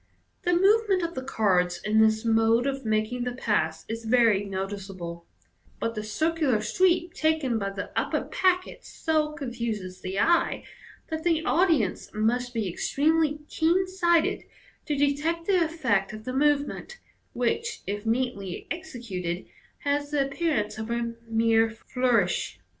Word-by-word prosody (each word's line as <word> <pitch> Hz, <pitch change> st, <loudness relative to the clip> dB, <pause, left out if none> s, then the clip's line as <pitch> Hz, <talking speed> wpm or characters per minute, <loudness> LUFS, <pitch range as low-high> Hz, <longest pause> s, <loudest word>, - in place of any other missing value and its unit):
The 355 Hz, -, +1 dB
move 415 Hz, +5 st, +4 dB
ment 370 Hz, -2 st, +2 dB
of 335 Hz, 0 st, -2 dB
the 260 Hz, -, -4 dB
cards 185 Hz, -8 st, +1 dB
in 215 Hz, +1 st, +2 dB
this 220 Hz, 0 st, +3 dB
mode 225 Hz, +1 st, +3 dB
of 275 Hz, -1 st, -2 dB
making 220 Hz, +2 st, 0 dB
the 245 Hz, 0 st, -2 dB
pass 160 Hz, -10 st, -1 dB
is 230 Hz, +1 st, -5 dB
very 225 Hz, -3 st, +4 dB
noticeable; 190 Hz, -3 st, -6 dB, 0.5 s
but 230 Hz, -, -1 dB
the 215 Hz, -, -4 dB
circular 300 Hz, +2 st, +1 dB
sweep 350 Hz, -, +2 dB
taken 315 Hz, -9 st, +1 dB
by 200 Hz, -1 st, -2 dB
the 195 Hz, 0 st, -6 dB
upper -, -, 0 dB
packet 370 Hz, -1 st, 0 dB
so 310 Hz, -2 st, -1 dB
confuses 235 Hz, -, -4 dB
the 190 Hz, +1 st, -3 dB
eye, 335 Hz, +7 st, +2 dB, 0.5 s
that 315 Hz, 0 st, -3 dB
the 330 Hz, -2 st, +1 dB
audience 320 Hz, -, +2 dB
must 245 Hz, +3 st, 0 dB
be 225 Hz, -4 st, -2 dB
extremely 300 Hz, -, +1 dB
keen 345 Hz, +4 st, +2 dB
sighted 345 Hz, -3 st, +1 dB, 0.4 s
to 295 Hz, -, 0 dB
detect 295 Hz, +4 st, 0 dB
the 370 Hz, -3 st, +3 dB
effect 235 Hz, -13 st, 0 dB
of 215 Hz, 0 st, -8 dB
the 255 Hz, -, -3 dB
move 290 Hz, +1 st, +3 dB
ment, 485 Hz, -, -8 dB, 0.4 s
which, 435 Hz, -, -1 dB
if 205 Hz, +1 st, -3 dB
neatly 225 Hz, -5 st, -2 dB
executed, 210 Hz, -, -4 dB, 0.4 s
has 285 Hz, 0 st, 0 dB
the 290 Hz, -2 st, +1 dB
appearance 270 Hz, -8 st, -1 dB
of 220 Hz, +1 st, -5 dB
a 235 Hz, 0 st, -1 dB
mere 225 Hz, 0 st, +3 dB
flourish. 225 Hz, -, 0 dB
245 Hz, 145 wpm, -26 LUFS, 215-315 Hz, 0.5 s, move